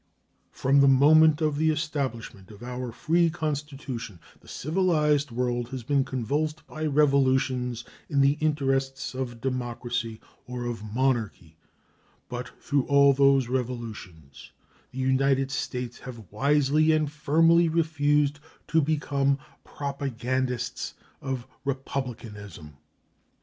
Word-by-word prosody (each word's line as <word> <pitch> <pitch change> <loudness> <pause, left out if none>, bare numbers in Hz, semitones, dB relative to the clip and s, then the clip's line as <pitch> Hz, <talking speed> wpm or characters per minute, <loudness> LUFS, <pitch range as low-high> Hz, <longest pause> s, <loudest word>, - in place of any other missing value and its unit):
From 140 +2 +3
the 140 - +6
moment 150 +3 +6
of 150 -2 +1
the 160 +1 +2
establishment 140 - -3
of 105 +1 -12
our 125 0 -5
free 165 +7 +2
Constitution 145 - -5 0.2
the - - -22
civilized 150 -3 +1
world 120 0 -2
has 130 -2 -6
been 140 +3 +2
convulsed 145 +5 -2
by 155 0 -4
revolutions 130 -4 +2 0.3
in 140 -3 +2
the 135 0 +5
interests 135 -3 0
of 125 -3 -5
democracy 120 -2 -3 0.3
or 125 -1 -5
of 120 -3 -4
monarchy, 110 -7 -1 0.7
but 125 0 -5
through 140 -2 0
all 140 -1 +6
those 135 -2 +4
revolutions 115 - -6 0.4
the - - -13
United 135 +1 +2
States 125 -2 -4
have 115 -7 -10
wisely 145 +6 +3
and 155 -2 +1
firmly 165 +3 +3
refused 150 -3 +1 0.3
to 160 - +3
become 140 -2 +1 0.3
propagandists 130 -3 -3 0.3
of 130 -3 -4 0.2
republicanism. 115 - -5
135 Hz, 115 wpm, -26 LUFS, 120-145 Hz, 0.7 s, the